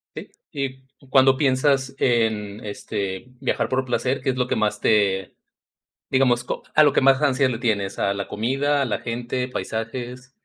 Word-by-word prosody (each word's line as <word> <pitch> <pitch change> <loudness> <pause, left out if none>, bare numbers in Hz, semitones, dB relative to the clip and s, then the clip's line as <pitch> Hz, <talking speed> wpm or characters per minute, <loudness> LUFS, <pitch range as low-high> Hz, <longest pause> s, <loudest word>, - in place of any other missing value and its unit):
Sí, - - -8 0.2
y 135 0 -7
cuando 130 0 +5
piensas 135 -1 +1
en 110 -3 0
este, 100 0 -4
viajar 135 - -1
por 130 0 0
placer, 130 +1 -1
¿qué 130 - +1
es 130 - -6
lo 125 -1 0
que - - 0
más 105 -1 0
te 100 -3 +1 0.7
digamos 125 -2 +2
co - - -4
a 155 - +7
lo 145 - +4
que - - +3
más 135 +1 +4
ansia 135 -2 +2
le 115 -3 -3
tienes, 100 -5 -1
a 100 - +1
la 100 0 -4
comida, 135 +6 0
a - - +2
la 120 - -2
gente, 120 +2 -3
paisajes? 125 +2 -5
125 Hz, 180 wpm, -23 LUFS, 110-135 Hz, 0.7 s, a